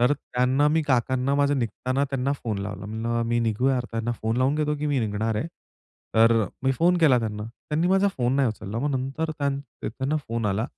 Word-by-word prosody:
तर 125 +4 +4
त्यांना 130 0 +1
मी 160 +2 +2
काकांना 130 0 +1
माझं 145 -1 +2
निघताना 130 +3 -1
त्यांना 135 +1 0
फोन 115 -7 -3
लावला. 100 0 -5
म्हणलं 115 +2 -2
मी 120 0 +1
निघू 115 +3 +1
या 135 - +2
अर्थान 125 -1 -4
त्यांना 115 +1 -1
फोन 110 +1 0
लावून 130 +3 +2
घेतो 150 -1 0
की 150 +1 -2
मी 145 -2 +1
निघणार 110 0 -1
आहे. 150 - -1 0.7
तर 115 +1 +6 0.3
मी 135 0 +2
फोन 175 +7 +3
केला 145 -7 +5
त्यांना. 105 -2 -3 0.3
त्यांनी 160 +4 +1
माझा 195 +2 +4
फोन 125 +1 +1
नाही 135 -4 +3
उचलला. 105 0 -5
मग 145 +4 0
नंतर 135 +5 -2
त्यां 140 -2 -1 0.3
त्यांना 135 +6 -2
फोन 115 -1 -1
आला 105 +3 0
130 Hz, 210 wpm, -25 LUFS, 115-145 Hz, 0.7 s, तर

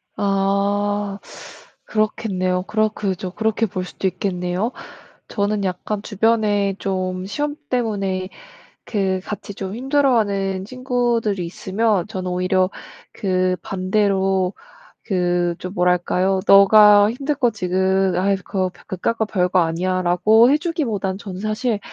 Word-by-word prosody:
아. 200 +1 0 0.7
그렇겠네요. 185 -4 -1
그렇 215 +2 +1
그죠. 190 -3 -4
그렇게 220 +1 0
볼 185 -1 -4
수도 190 - -3
있겠네요. 180 +3 -2 0.6
저는 205 -1 -1
약간 190 +3 -3
주변에 210 -2 +1
좀 185 -1 -3
시험 290 +8 -3
때문에 195 -6 -1 0.6
그 190 -3 -1
같이 205 -1 -6
좀 195 0 -5
힘들어하는 225 -8 +1
친구들이 240 -5 -1
있으면 195 +2 -1
저는 185 -4 -4
오히려 185 +1 +1 0.4
그 185 -2 0
반대로 190 -1 0 0.5
그 175 -3 0
좀 185 - -6
뭐랄까요? 180 +1 +1
"네가 205 +1 +7
힘들 275 +4 -2
거 245 -3 +2
지금 190 -1 +1
아이 195 +2 +2
그거 185 0 -2
벼 - - -19
그깟 190 +5 -2
거 220 - +2
별거 180 -2 +1
아니야."라고 185 +6 +3
해 295 - +4
주기보다는 250 - -2
저는 190 -2 -7
사실 215 +2 -1
195 Hz, 265 characters per minute, -21 LUFS, 185-215 Hz, 0.7 s, 네가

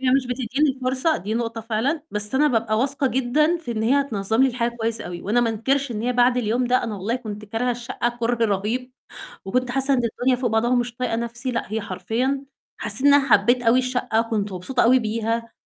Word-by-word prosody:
هي 260 -1 +1
مش 260 0 +2
بتدّيني 255 +4 0
الفرصة، 260 +4 0
دي 210 +4 -4
نقطة 230 -1 -2
فعلًا. 230 +8 -1
بس 210 +3 -2
أنا 295 +3 +4
بابقى 225 -3 0
واثقة 270 +2 0
جدًا 265 +7 +2
في 325 -8 -8
إن 220 -1 -2
هي 265 +6 +3
هتنظم 220 -3 0
لي 265 - +5
الحاجة 235 -1 -2
كويس 225 0 -1
أوي، 175 -1 -7
وأنا 220 +5 +1
ما 235 -1 +1
أنكرش 265 +5 0
إن 215 -2 -3
هي 250 +1 0
بعد 245 0 +3
اليوم 240 +1 0
ده، 255 +1 +2
أنا 225 -3 -4
والله 210 +6 -2
كنت 215 -4 -7
كارهة 225 +4 -1
الشقة 240 0 -2
كره 235 0 +1
رهيب، 220 +5 -2 0.5
وكنت 250 +6 -1
حاسة 270 +2 +3
إن 250 - +2
الدنيا 245 +3 +1
فوق 245 -1 -1
بعضها 220 +2 +1
ومش 245 -1 0
طايقة 250 -2 -1
نفسي 235 +2 -4
لأ، 230 -4 -4
هي 220 - 0
حرفيًا 225 +8 -2 0.3
حسيت 240 +7 -1
إن 285 - +7
أنا 280 -1 +3
حبيت 240 +5 +4
أوي 235 +1 +4
الشقة، 250 -3 0
كنت 215 -3 -2
مبسوطة 185 +8 -1
أوي 255 +2 +5
بيها. 230 0 -2
240 Hz, 220 wpm, -23 LUFS, 225-255 Hz, 0.5 s, إن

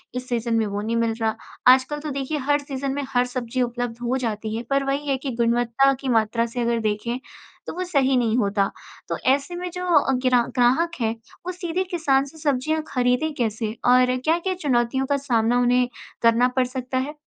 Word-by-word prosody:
इस 250 0 -5
सीज़न 235 -1 0
में 225 - +2
वो 205 0 -3
नहीं 225 +2 -2
मिल 230 -1 +1
रहा। 220 0 +1 0.4
आजकल 265 +3 0
तो 300 0 -5
देखिए, 275 +2 -2
हर 290 +1 +1
सीज़न 275 -1 -4
में 285 +1 -2
हर 250 -2 +2
सब्ज़ी 250 0 -3
उपलब्ध 240 -1 -2
हो 255 +2 +1
जाती 215 0 -4
है, 230 - -3
पर 275 0 +2
वही 275 +2 -2
है 275 -1 +1
कि 270 - -1
गुणवत्ता 240 +3 +3
की 270 - -3
मात्रा 220 +2 0
से 245 - 0
अगर 235 0 +1
देखें, 220 +3 -2 0.5
तो - - -4
वो 365 - -2
सही 275 -7 +2
नहीं 230 -2 +1
होता। 200 -3 +1 0.4
तो - - -1
ऐसे 280 +6 +2
में 360 +1 -4
जो 360 0 -4
अ, 270 - 0
ग्रा 250 -1 +5
ग्राहक 260 +7 +3
है, 225 -1 +1 0.3
वो 365 - -2
सीधे 360 0 -2
किसान 275 -6 +2
से 280 +3 -13
सब्ज़ियाँ 305 +1 0
खरीदें 250 +4 +1
कैसे 220 -2 -1 0.2
और 250 0 +5
क्या-क्या 335 +8 0
चुनौतियों 265 -6 0
का 280 +1 +1
सामना 245 -3 +1
उन्हें 245 0 +3 0.3
करना 230 +1 +4
पड़ 255 - +4
सकता 255 0 -4
है? 270 +3 -2
255 Hz, 205 wpm, -23 LUFS, 235-280 Hz, 0.5 s, ग्रा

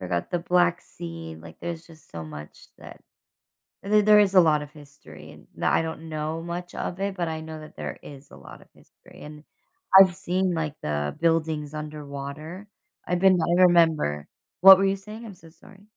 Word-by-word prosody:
forgot 90 -2 -3
the 175 - 0
Black 175 0 +2
Sea, 85 -1 -9
like, 80 -1 -13
there's 170 -1 -6
just 160 -2 -18
so 80 -1 -7
much 75 -1 -11
that - - -13 0.8
th 210 +1 +3
there 210 0 +6
is 200 -2 +3
a 185 - +8
lot 155 -3 +3
of 145 - -10
history, 145 -2 -14
and - - -16
the - - -3
I - - +2
don't 160 0 -7
know 155 +1 -4
much 175 +1 -7
of 180 - -5
it, 200 0 -2
but 175 -2 -2
I 160 0 -4
know 160 0 -9
that 155 - -13
there - - -6
is 140 -1 -13
a - - -14
lot - - -14
of - - -20
history, - - -19
and 150 0 -11 0.5
I've 190 -2 +7
seen, 185 -1 -1
like, 155 -3 -3
the 75 -1 -3
buildings 160 -3 0
underwater. 150 +4 -8 0.4
I've 180 0 0
been 190 -1 +4
I 175 +2 +2
remember 160 - +3 0.3
What 190 +1 +10
were 195 - +1
you 195 0 +1
saying? 215 +4 -11
I'm 215 - -9
so 165 -2 -17
sorry. 195 +4 -19
160 Hz, 200 wpm, -25 LUFS, 150-180 Hz, 0.8 s, What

